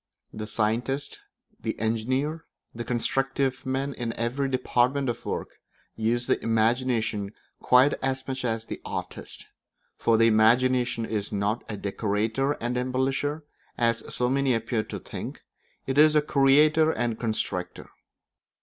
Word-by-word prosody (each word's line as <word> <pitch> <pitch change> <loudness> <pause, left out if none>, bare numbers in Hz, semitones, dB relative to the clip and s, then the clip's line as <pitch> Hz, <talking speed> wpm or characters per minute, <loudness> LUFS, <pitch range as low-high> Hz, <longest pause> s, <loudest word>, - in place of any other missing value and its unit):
The 110 0 -5
scientist, 120 +6 -1 0.4
the - - -3
engineer, 130 +8 -1 0.3
the 120 - -5
constructive 135 +2 -1
man 135 +2 -1
in 115 -3 -4
every 130 +4 -1
department 130 +1 +1
of 120 0 -5
work, - - -4 0.4
use 115 +2 0
the - - +1
imagination 115 -2 0 0.3
quite 130 +3 +5
as 135 0 -2
much 130 -1 -3
as 115 -2 -1
the - - -7
artist; - - -6 0.5
for 115 -1 +2
the 115 - +5
imagination 120 +2 +3
is 105 -2 -3
not 105 +3 -1
a 105 - -4
decorator 110 +7 -1
and 120 -2 -3
embellisher, 135 +4 -1 0.3
as 115 -1 0
so 125 - 0
many 135 -1 +2
appear 115 0 -1
to - - -6
think; - - -7 0.4
it 135 +2 0
is 155 0 +6
a 150 - +6
creator 150 +2 +4
and 120 -7 -1
constructor. 110 -5 -3
125 Hz, 135 wpm, -26 LUFS, 115-135 Hz, 0.5 s, is